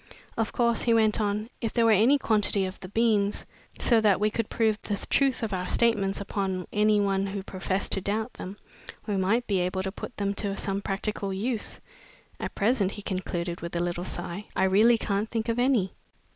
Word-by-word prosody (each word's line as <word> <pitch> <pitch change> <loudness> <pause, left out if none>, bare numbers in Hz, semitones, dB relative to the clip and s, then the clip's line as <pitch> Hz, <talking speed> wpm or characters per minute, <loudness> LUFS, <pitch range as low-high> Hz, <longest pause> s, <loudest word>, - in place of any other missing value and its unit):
Of 225 -1 -1
course," 235 -2 +1
he 230 -1 +3
went 220 0 +3
on, 210 +3 -1
"if 225 -3 -2
there 235 -1 +3
were 225 - +5
any 225 +7 +5
quantity 210 -5 +1
of 185 0 -6
the 185 - -8
beans, 210 -2 +1 0.3
so 230 -3 +4
that 205 -4 +4
we 210 +1 +2
could 230 0 -2
prove 220 -2 +1
the 205 - -3
truth 270 -3 +2
of 215 -3 -2
our 180 -1 -2
statements 205 -4 +2
upon 195 -2 -2
any 210 0 +3
one 195 -1 +1
who 195 0 -4
professed 190 0 -3
to 195 - +1
doubt 215 +5 -2
them, 190 +3 -8 0.5
we 205 - -1
might 200 +6 +1
be 195 -3 +1
able 185 +1 -1
to 190 - -3
put 225 - -8
them 200 -1 0
to 200 -1 -3
some 195 0 -1
practical 200 0 -2
use. 215 +4 -3 0.6
At - - -5
present," 205 -2 +1
he 205 - -8
concluded, 175 -3 -3
with 170 +1 -6
a - - +1
little 175 0 -2
sigh, 175 +2 -4
"I - - +2
really 215 +5 +5
can't 205 0 -1
think 225 -1 -2
of 230 +1 0
any." 245 -7 +2
205 Hz, 205 wpm, -27 LUFS, 195-225 Hz, 0.6 s, were